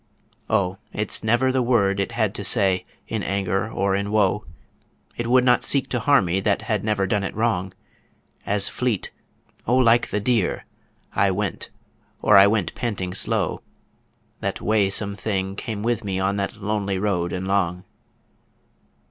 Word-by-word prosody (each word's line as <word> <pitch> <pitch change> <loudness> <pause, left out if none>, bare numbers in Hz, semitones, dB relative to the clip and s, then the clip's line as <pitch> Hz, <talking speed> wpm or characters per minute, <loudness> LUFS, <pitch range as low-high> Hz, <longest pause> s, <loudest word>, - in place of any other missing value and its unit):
O 95 -3 0
it's 105 0 -3
never 120 +4 +2
the 130 0 +1
word 100 -5 +2
it 100 +4 -2
had 110 -4 0
to 100 - -5
say 95 -4 +2 0.2
in - - -2
anger 95 +2 -1
or 100 0 0
in 100 +1 -2
woe 105 0 +2 0.7
It 120 - -3
would 125 +1 +4
not 125 -1 +3
seek 140 -2 0
to 125 - -1
harm 140 -4 +4
me 90 +2 0
that 100 +1 0
had 110 -4 -1
never 105 -3 +1
done 100 +1 0
it 95 - -4
wrong, 100 -4 0 0.7
As 100 -1 +2
fleet 120 -7 -2 0.6
O 120 - +3
like 120 -2 +4
the 105 - -1
deer! 110 -2 0 0.5
I 100 - +3
went, 100 0 -3 0.5
or 105 - +4
I 100 0 +9
went 105 -3 0
panting 95 -6 -3
slow, - - -1 0.8
The - - -2
waesome 100 -1 +1
thing 95 -2 -2
came 105 -1 -5
with 115 -1 0
me 95 -2 -2
on 95 +1 0
that 100 +1 -2
lonely 100 -2 -1
road 95 -3 -1
and 95 +1 -4
long. 90 -2 0
100 Hz, 165 wpm, -23 LUFS, 95-110 Hz, 0.8 s, I